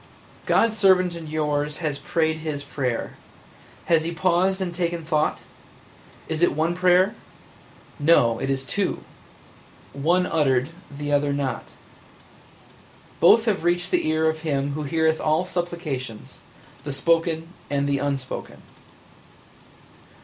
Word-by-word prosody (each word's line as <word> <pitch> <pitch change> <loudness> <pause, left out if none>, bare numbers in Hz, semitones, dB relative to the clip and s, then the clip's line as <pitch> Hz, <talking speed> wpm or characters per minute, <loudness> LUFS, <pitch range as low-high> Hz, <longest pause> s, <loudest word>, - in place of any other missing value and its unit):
"God's 225 -1 +3
servant 185 -3 +4
and 165 -2 -8
yours 150 -1 -1
has 150 -4 -3
prayed 160 +2 0
his 155 -3 -4
prayer. 130 -4 -3 0.7
Has 165 -2 +3
he 165 - -2
paused 185 +2 +1
and 180 -2 -3
taken 170 -1 -2
thought? 155 -1 0 0.8
Is 160 0 -3
it 175 - +4
one 160 +3 +1
prayer? 180 +3 +3 0.9
No, 135 -7 +4
it 135 - -2
is 135 -1 -1
two 195 +7 -2 0.5
– - - -26
one 170 +6 +2
uttered, 135 -5 +1 0.2
the 145 0 -5
other 145 0 +2
not. 140 -2 -2 1.5
Both 220 +7 +6
have 210 -6 0
reached 175 +1 0
the - - +1
ear 155 0 +2
of 160 0 0
Him 140 -3 -1
Who 150 +1 -4
heareth 160 +1 +1
all 155 +3 +1
supplications, 170 -10 -5 0.4
the 145 - -4
spoken 165 +2 +1 0.2
and 140 0 0
the 140 -1 +1
unspoken. 140 -2 -4
160 Hz, 130 wpm, -24 LUFS, 145-175 Hz, 1.5 s, Both